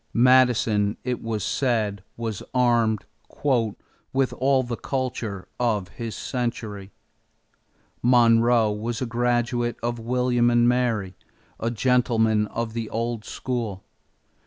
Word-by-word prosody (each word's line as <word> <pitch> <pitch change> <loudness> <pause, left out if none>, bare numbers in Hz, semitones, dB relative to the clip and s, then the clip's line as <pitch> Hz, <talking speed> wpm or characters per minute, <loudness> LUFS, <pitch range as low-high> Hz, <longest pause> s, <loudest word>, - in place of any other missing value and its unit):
Madison, 115 -4 +4
it 125 -1 -2
was 110 -3 -3
said, 110 -7 0
was 115 -4 -4
armed 120 -4 +2 1.1
"with 135 -1 +1
all 130 0 +3
the 120 -1 -4
culture 120 -7 -4
of 105 -7 0
his 115 +3 -6
century." 110 -6 -4 1.1
Monroe 115 -2 +4
was 115 +3 -3
a 130 - -1
graduate 120 0 0
of 120 0 -2
William 120 0 +1
and 120 0 +4
Mary, 120 -6 +1 0.5
a 115 - -1
gentleman 115 -3 +2
of 115 0 -4
the 115 -2 -4
old 115 -1 -2
school. 115 -8 -4
120 Hz, 110 wpm, -24 LUFS, 110-125 Hz, 1.1 s, Madison